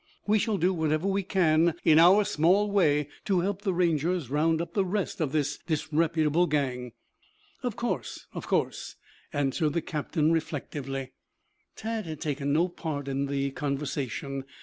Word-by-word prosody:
We 210 +1 +3
shall 210 0 0
do 185 +2 +2
whatever 160 +1 0
we 195 0 +1
can 170 -4 +2
in 160 -1 +7
our 185 +5 +7
small 190 +7 +3
way 150 -7 +3 0.2
to 190 -4 +2
help 195 +2 -2
the 200 -2 0
Rangers 170 -4 0
round 160 +2 +2
up 170 0 -4
the 200 - +2
rest 190 -1 -2
of 150 -4 0
this 150 -2 -1
disreputable 160 +1 +1
gang." 125 -5 -1 0.7
"Of - - -2
course, - - -3
of - - -6
course," - - -1 0.4
answered 145 +2 0
the 170 - 0
captain 155 0 0
reflectively. 140 -4 -3 0.6
Tad 220 -3 -4
had 155 -2 -6
taken 140 -1 -2
no 165 +5 +3
part 155 -5 -5
in 140 +1 -1
the 140 0 -1
conversation. 140 -1 -3
155 Hz, 155 wpm, -28 LUFS, 145-180 Hz, 0.7 s, in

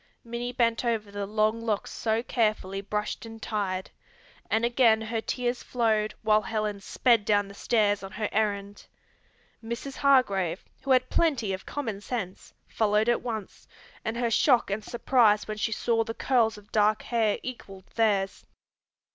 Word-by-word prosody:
Minnie 240 +1 -4
bent 235 -2 +1
over 225 -4 -1
the 200 0 -4
long 215 +2 +1
locks 215 -3 -2
so 225 0 -1
carefully 215 -5 0
brushed 210 +1 -3
and 225 -1 -9
tied, 195 -4 -3 0.6
and 225 +1 +2
again 235 -2 +4
her 220 0 -3
tears 245 +1 -2
flowed 220 -3 0
while 215 0 +4
Helen 215 -1 -3
sped 230 +1 +2
down 205 -1 +2
the 200 - -11
stairs 205 -1 +1
on 195 0 -8
her 210 0 -2
errand. 205 -1 -2 0.8
Mrs. 235 +4 -5
Hargrave, 200 -11 +2 0.2
who 275 - -8
had 255 -1 +3
plenty 260 - +1
of 190 - -7
common 225 -9 -4
sense, 205 -5 -5 0.2
followed 215 +1 +1
at 240 - +2
once, 220 -4 -6 0.4
and 225 +1 -3
her 235 -1 0
shock 245 -2 +3
and 210 +2 -2
surprise 235 -4 +3
when 215 0 -4
she 220 - -1
saw 225 +1 +1
the 225 0 -6
curls 230 -5 +2
of 210 0 -16
dark 215 0 +2
hair 225 -3 +1
equalled 195 -7 -8
theirs. 205 -4 +1
220 Hz, 160 wpm, -27 LUFS, 205-235 Hz, 0.8 s, again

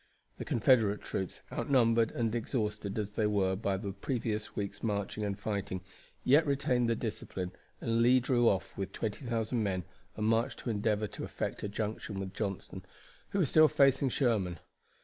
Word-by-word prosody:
The - - -5
Confederate 110 -3 +3
troops, 95 -2 -4
outnumbered 115 -4 +3
and 115 -2 0
exhausted 105 -4 -2
as 105 -1 -2
they 105 +1 +1
were 95 -2 +2
by 100 -1 -1
the 100 0 -4
previous 110 -2 -3
week's 100 -1 -4
marching 105 -1 -2
and 100 -1 -2
fighting, 100 -3 -3 0.4
yet 145 +4 +5
retained 130 -4 +2
their 115 - +2
discipline, 95 -5 -4 0.3
and 115 0 +1
Lee 125 +2 +6
drew 120 -1 +3
off 95 - -1
with 95 -1 -4
20,000 115 +1 -2
men 95 -3 -1 0.3
and 105 - -1
marched 115 +1 +2
to 120 - -2
endeavor 105 0 +1
to 100 - -7
effect - - -4
a 105 - -3
junction 105 -1 -3
with 95 -1 -5
Johnston, 100 -2 -4 0.5
who - - -2
was 170 -9 +2
still 155 0 +8
facing 135 -2 +4
Sherman. 110 - +1
110 Hz, 170 wpm, -32 LUFS, 100-120 Hz, 0.5 s, still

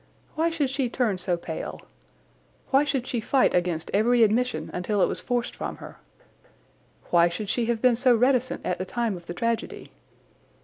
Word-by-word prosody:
Why 325 +2 +1
should 300 -5 -1
she 270 -2 -1
turn 230 -6 0
so 180 -1 0
pale? - - -6 0.9
Why 275 +1 +5
should 275 -4 -1
she 245 - -2
fight 260 +4 +2
against 175 -2 -1
every 230 +4 +4
admission 240 +4 0
until 190 +4 -1
it - - +6
was - - -3
forced 245 -1 -2
from - - -5
her? - - -11 1.1
Why 170 0 +5
should 200 +4 -5
she 235 +1 0
have 235 -1 -1
been 250 -2 +5
so 250 +1 +4
reticent 255 +1 +1
at 180 - -1
the - - -1
time 230 0 -2
of 175 -1 -12
the 175 - -6
tragedy? 230 +1 -3
235 Hz, 180 wpm, -25 LUFS, 190-255 Hz, 1.1 s, it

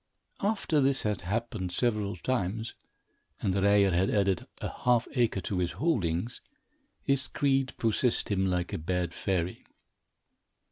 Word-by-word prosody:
After 195 -7 +1
this 135 0 +2
had 105 -3 -1
happened 105 0 -2
several 105 -2 0
times, 110 +1 -2 0.7
and 95 - 0
Ryer 100 0 +4
had 90 +3 +2
added 100 -4 +1
a - - -3
half 120 -2 +3
acre 120 -7 +1
to 90 +1 -2
his 90 -1 0
holdings, 115 - -1 0.6
his 140 -1 +1
greed 135 -2 +1
possessed 115 0 +1
him 95 -1 +2
like 90 -1 -1
a - - -2
bad 90 +1 -1
fairy. 90 -2 -2
100 Hz, 135 wpm, -29 LUFS, 90-125 Hz, 0.7 s, Ryer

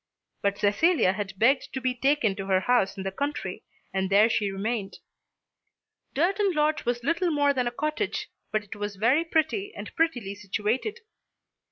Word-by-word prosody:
But 200 0 0
Cecilia 210 - +3
had 195 -1 -5
begged 260 +6 +3
to 265 - -2
be 255 -1 0
taken 250 -5 +2
to 195 -1 -5
her 190 -1 +3
house 200 -3 +2
in 190 - -4
the 195 - -2
country, 285 +8 -4 0.3
and 190 -1 0
there 205 +3 +5
she 205 -3 +1
remained. 200 +1 -3 1.2
Durton 385 +6 +2
Lodge 305 0 +1
was 240 0 -1
little 335 +6 +1
more 290 -2 +3
than 250 -2 0
a - - -1
cottage, 305 +10 -2 0.2
but 215 0 0
it 205 - -9
was 205 0 -4
very 240 +11 +3
pretty 330 +5 0
and - - -8
prettily 250 - 0
situated. 215 - -2
245 Hz, 170 wpm, -27 LUFS, 200-305 Hz, 1.2 s, there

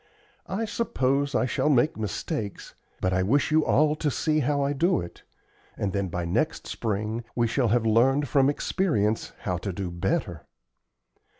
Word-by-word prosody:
I 215 +4 -1
suppose 140 - 0
I 125 - +2
shall 130 - 0
make 145 +3 +3
mistakes, 110 - -4 0.3
but 95 0 +1
I 95 - +2
wish 135 +11 +2
you 155 0 +4
all 150 +2 +3
to 150 - 0
see 155 +3 0
how 145 0 +1
I 140 +1 0
do 170 +6 +2
it, 85 0 -8 0.6
and 100 -2 -2
then 100 -1 -1
by 90 0 -3
next 85 - -1
spring 110 +2 -3
we 120 - +2
shall 120 +2 +1
have 115 +1 +2
learned 130 +6 +3
from 135 +2 +3
experience 115 - 0
how 90 -2 -1
to 95 +3 -4
do 90 -1 -4
better. 85 0 -2
125 Hz, 170 wpm, -26 LUFS, 100-145 Hz, 0.6 s, you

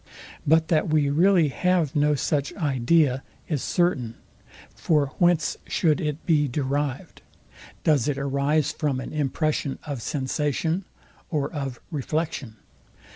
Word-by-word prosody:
But 160 +1 +4
that 160 -1 +2
we 150 -2 +2
really 170 0 +4
have 170 0 +1
no 150 0 +3
such 140 0 -1
idea, 140 -2 +2 0.3
is 150 -6 -1
certain. 135 -11 0 0.6
For 150 -4 +1
whence 175 -3 +3
should 160 0 +1
it 150 -1 -3
be 150 -4 +3
derived? 140 0 -3 0.6
Does 150 -5 +3
it 145 -2 0
arise 140 +2 +1
from 145 -4 -1
an 130 - -7
impression 150 -1 -1
of 140 -5 -4
sensation 150 +7 -1 0.4
or 150 0 -2
of 135 -5 -4
reflection? 150 -5 -3
150 Hz, 125 wpm, -25 LUFS, 140-160 Hz, 0.6 s, But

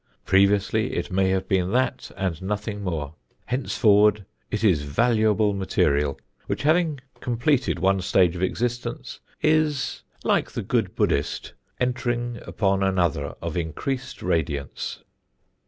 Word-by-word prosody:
Previously 100 +4 +3
it - - -3
may 95 0 +2
have 95 0 0
been 95 -1 +1
that 130 0 0
and 95 -4 -2
nothing 105 +1 -3
more; 80 -6 -3 0.3
henceforward 105 -4 +3 0.2
it 105 0 -2
is 90 -9 +4
valuable 110 +6 +2
material 75 -7 +1 0.3
which, - - -2
having 155 -1 +2 0.2
completed 125 - +1
one 95 +2 +2
stage 90 -1 +3
of 90 - -5
existence, 120 +5 -2 0.2
is, 155 -3 +1 0.2
like - - +2
the - - -4
good - - 0
Buddhist, 70 - 0 0.3
entering 120 -1 -1
upon 100 -2 +1
another 85 -7 0
of 85 0 -3
increased 125 - -3
radiance. 75 -5 -2
100 Hz, 120 wpm, -24 LUFS, 90-120 Hz, 0.3 s, is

